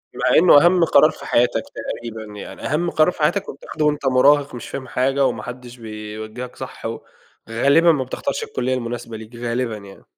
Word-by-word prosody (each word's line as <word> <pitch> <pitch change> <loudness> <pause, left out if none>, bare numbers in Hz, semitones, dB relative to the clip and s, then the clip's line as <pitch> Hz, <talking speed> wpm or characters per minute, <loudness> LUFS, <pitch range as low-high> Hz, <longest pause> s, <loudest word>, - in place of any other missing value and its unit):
مع - - +2
إنه 165 -2 +7
أهم 175 0 +4
قرار 155 0 +5
في - - -12
حياتك 120 0 +2
تقريبًا، 110 -2 -6
يعني - - -9
أهم 170 +5 0
قرار 155 +2 +3
في 165 - -11
حياتك 200 +6 +1
وبتاخده 150 +2 -4
وأنت 150 -2 0
مُراهق 140 +1 +4
مش 120 - -8
فاهم 130 -2 -6
حاجة 135 +2 +1
وما - - -1
حدش 125 0 -9
بيوجِّهك 110 +2 -8
صح - - -9
و - - -4 0.5
غالبًا 140 +9 +4
ما 140 -4 0
بتختارش 280 - -4
الكُلّية 130 - -2
المناسبة 120 -2 -5
ليك، 110 +2 -12
غالبًا 120 -1 -2
يعني. 100 -1 -14
130 Hz, 185 wpm, -21 LUFS, 115-150 Hz, 0.5 s, إنه